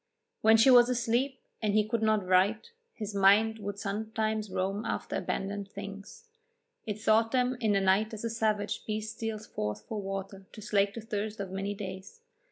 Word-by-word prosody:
When 220 Hz, +1 st, +6 dB
she 225 Hz, +4 st, +6 dB
was 245 Hz, -1 st, +7 dB
asleep 250 Hz, +2 st, 0 dB, 0.2 s
and 210 Hz, -2 st, +1 dB
he 215 Hz, 0 st, +3 dB
could 230 Hz, 0 st, -1 dB
not 215 Hz, -3 st, +2 dB
write, 190 Hz, -, +2 dB, 0.2 s
his 210 Hz, -2 st, -5 dB
mind 205 Hz, +3 st, +4 dB
would 205 Hz, -1 st, -5 dB
sometimes 215 Hz, +1 st, -2 dB
roam 195 Hz, +3 st, -2 dB
after -, -, -3 dB
abandoned 200 Hz, 0 st, -3 dB
things; 200 Hz, -, -9 dB, 0.6 s
it 210 Hz, 0 st, -3 dB
sought 220 Hz, +1 st, +3 dB
them 255 Hz, 0 st, +1 dB
in 220 Hz, -4 st, +2 dB
the 195 Hz, -, +2 dB
night 195 Hz, +3 st, +3 dB
as 220 Hz, -1 st, -7 dB
a 230 Hz, -, -1 dB
savage 215 Hz, -2 st, -1 dB
beast 215 Hz, +1 st, -3 dB
steals 220 Hz, -1 st, -4 dB
forth 105 Hz, -, -4 dB
for 215 Hz, -2 st, -4 dB
water 195 Hz, 0 st, -6 dB
to -, -, -10 dB
slake 205 Hz, -2 st, +1 dB
the 230 Hz, -, -5 dB
thirst 215 Hz, -1 st, -4 dB
of 195 Hz, -2 st, -4 dB
many 195 Hz, +1 st, -3 dB
days. 190 Hz, -, -8 dB
215 Hz, 180 wpm, -30 LUFS, 200-220 Hz, 0.6 s, was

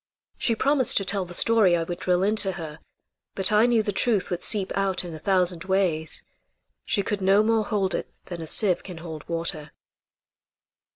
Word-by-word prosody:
She 230 Hz, -, +1 dB
promised 270 Hz, +1 st, +3 dB
to 195 Hz, -, 0 dB
tell 195 Hz, -1 st, 0 dB
the 175 Hz, -, -11 dB
story 210 Hz, -6 st, +4 dB
I 165 Hz, -, -1 dB
would 175 Hz, +1 st, -6 dB
drill 180 Hz, 0 st, +1 dB
into 205 Hz, -1 st, +2 dB
her, 160 Hz, -3 st, -8 dB, 0.6 s
but 190 Hz, 0 st, +2 dB
I 215 Hz, +3 st, +4 dB
knew 235 Hz, -3 st, +2 dB
the 205 Hz, -, -2 dB
truth 205 Hz, -1 st, 0 dB
would 175 Hz, -, -2 dB
seep 200 Hz, -3 st, 0 dB
out 195 Hz, -2 st, -1 dB
in 170 Hz, -, -7 dB
a 155 Hz, -, -8 dB
thousand 180 Hz, -1 st, 0 dB
ways. 180 Hz, -5 st, -1 dB, 0.6 s
She 200 Hz, -, 0 dB
could 205 Hz, -1 st, -3 dB
no 195 Hz, +2 st, +4 dB
more 220 Hz, -1 st, +1 dB
hold 195 Hz, -3 st, -1 dB
it -, -, -4 dB, 0.2 s
than 175 Hz, -2 st, -7 dB
a 160 Hz, -, -7 dB
sieve 190 Hz, +1 st, +3 dB
can 180 Hz, -3 st, -10 dB
hold 160 Hz, -2 st, -9 dB
water. 165 Hz, -3 st, -3 dB
190 Hz, 190 wpm, -24 LUFS, 175-210 Hz, 0.6 s, story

